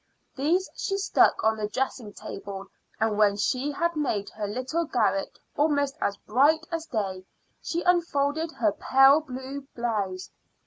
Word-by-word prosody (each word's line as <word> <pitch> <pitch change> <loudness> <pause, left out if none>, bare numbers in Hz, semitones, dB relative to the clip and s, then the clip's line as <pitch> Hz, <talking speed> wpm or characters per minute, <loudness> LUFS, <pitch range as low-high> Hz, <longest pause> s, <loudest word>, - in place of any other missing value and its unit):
These 330 +7 +1
she 390 - -2
stuck 395 - +3
on 220 0 +3
the 210 -1 -2
dressing 245 -2 -3
table, 195 -1 -7 0.3
and 220 -1 +1
when 205 -1 +4
she 255 +7 0
had 340 +3 -1
made 220 -10 -1
her 210 -1 -4
little 255 +10 -2
garret 205 -8 0 0.2
almost 285 -2 +1
as 200 - 0
bright 295 +8 +3
as 330 -1 -3
day 195 -7 -3 0.4
she 340 +1 -2
unfolded 320 -3 +1
her 220 -3 +1
pale 270 +7 +5
blue 270 -1 -7
blouse. 205 -6 -2
260 Hz, 145 wpm, -26 LUFS, 210-305 Hz, 0.4 s, pale